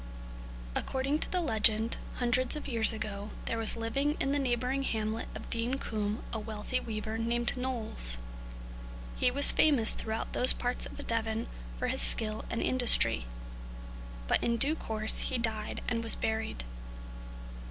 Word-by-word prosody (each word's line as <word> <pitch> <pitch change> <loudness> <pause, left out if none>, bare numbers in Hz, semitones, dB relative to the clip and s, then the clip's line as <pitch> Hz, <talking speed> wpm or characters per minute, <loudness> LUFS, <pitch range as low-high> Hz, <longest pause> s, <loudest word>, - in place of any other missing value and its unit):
According 270 - -2
to - - -1
the 365 - 0
legend, 220 -4 +2 0.2
hundreds 250 +2 0
of 300 - -7
years 230 -4 +4
ago, 215 -2 -6 0.2
there 230 - -3
was 225 - 0
living 275 +6 -2
in 275 - -1
the 285 - 0
neighbouring 255 +1 -1
hamlet 220 -3 -3
of - - -9
Dean 235 +3 0
Combe 215 -4 -4
a 225 - -2
wealthy 215 +3 -4
weaver 220 -1 -5
named 235 +1 -1
Knowles. 230 - -3 1.0
He - - +2
was 280 +3 +8
famous 270 -8 +5
throughout 220 0 -5
those 250 - +7
parts 245 0 -2
of - - -10
Devon 225 0 -2 0.3
for - - -3
his - - 0
skill 215 -1 +1
and 230 - -3
industry. 245 - +4 1.0
But - - +1
in 235 0 0
due 280 +6 +7
course 220 -7 -1
he 260 - -1
died 220 -2 -2
and 230 -2 -2
was 230 - +6
buried. 220 - -3
230 Hz, 150 wpm, -29 LUFS, 220-255 Hz, 1.0 s, was